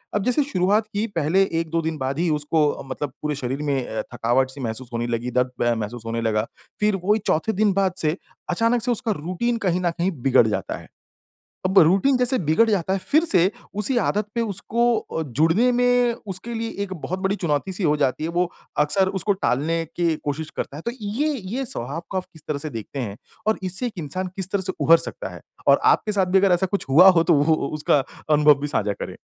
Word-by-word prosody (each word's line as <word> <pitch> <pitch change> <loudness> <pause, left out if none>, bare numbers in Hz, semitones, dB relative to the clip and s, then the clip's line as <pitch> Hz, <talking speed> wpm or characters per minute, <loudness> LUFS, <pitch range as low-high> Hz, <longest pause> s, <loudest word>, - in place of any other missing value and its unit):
अब 205 - +1
जैसे 250 +6 +2
शुरुआत 210 -4 +1
की 205 +2 0
पहले 165 +4 +2 0.2
1-2 165 0 -1
दिन 160 -1 -3
बाद 135 +1 -3
ही 175 0 +1
उसको 150 +1 0 0.3
मतलब 145 +2 -4
पूरे 150 -1 -2
शरीर 135 +1 -3
में 135 -3 -1
अ, 110 0 -3
थकावट 125 +3 +1
सी 135 +1 -9
महसूस 115 +1 -4
होने 120 0 -1
लगी, 120 +1 -2
दर्द 125 +1 +1
म 120 0 +3
महसूस 110 +2 -5
होने 115 0 -2
लगा, 110 -1 0 0.3
फिर 210 -1 +2
वही 210 +3 +3
चौथे 160 +8 +1
दिन 205 0 +2
बाद 190 -1 +1
से 155 +2 0 0.3
अचानक 230 +6 +2
से 245 +2 0
उसका 230 -1 -1
रूटीन 185 +10 -2
कहीं 180 0 +1
न 175 - +1
कहीं 180 +3 +1
बिगड़ 125 -2 +5
जाता 100 -4 -2
है। - - -13 0.8
अब 190 +1 +5
रूटीन 195 - +4
जैसे 250 +1 +2
बिगड़ 195 +9 +4
जाता 190 -3 +1
है 195 - 0
फिर 305 - +2
से, 185 - +3 0.2
उसी 210 +5 0
आदत 210 -3 +1
पे 235 - +1
उसको 230 +3 0
अ, 160 - -5
जुड़ने 165 - +2
में 245 0 +3
उसके 190 +5 -5
लिए 225 0 -3
एक 190 -2 -5
बहुत 185 +2 -5
बड़ी 195 +1 0
चुनौती 170 -1 -1
सी 185 - -4
हो 150 -2 +3
जाती 140 0 0
है, 160 - -1
वो 175 +1 0 0.3
अक्सर 185 +6 +3
उसको 205 +4 +2
टालने 165 +1 0
की 170 -2 +1
कोशिश 150 +2 -3
करता 140 - -4
है। - - -7
तो 235 - -1
ये 225 +9 -1 0.3
ये 270 +1 -2
स्वभाव 150 - -5
को 190 - -2
आप 185 - -3
किस 160 - -15
तरह 150 - -1
से 150 +2 -5
देखते 115 +2 -7
हैं? 105 -5 -4 0.3
और 220 - +3
इससे 185 +7 -2
एक 235 - -7
इंसान 175 +4 -3
किस 190 -1 -3
तरह 200 - 0
से 185 0 -2
उभर 165 +1 +7
सकता - - -5
है? - - -11 0.3
और - - +6
आपके 215 - +3
साथ 200 -2 +2
भी 185 +1 +3
अगर 195 0 +4
ऐसा 175 +2 +2
कुछ 200 - -1
हुआ 165 +8 +8
हो 170 -3 +4
तो - - +3
वो 150 +2 +4
उसका 150 -1 +1 0.3
अनुभव 150 -1 +5
भी 145 - -1
साझा 105 -7 0
करें। - - -7
175 Hz, 225 wpm, -23 LUFS, 145-205 Hz, 0.8 s, हुआ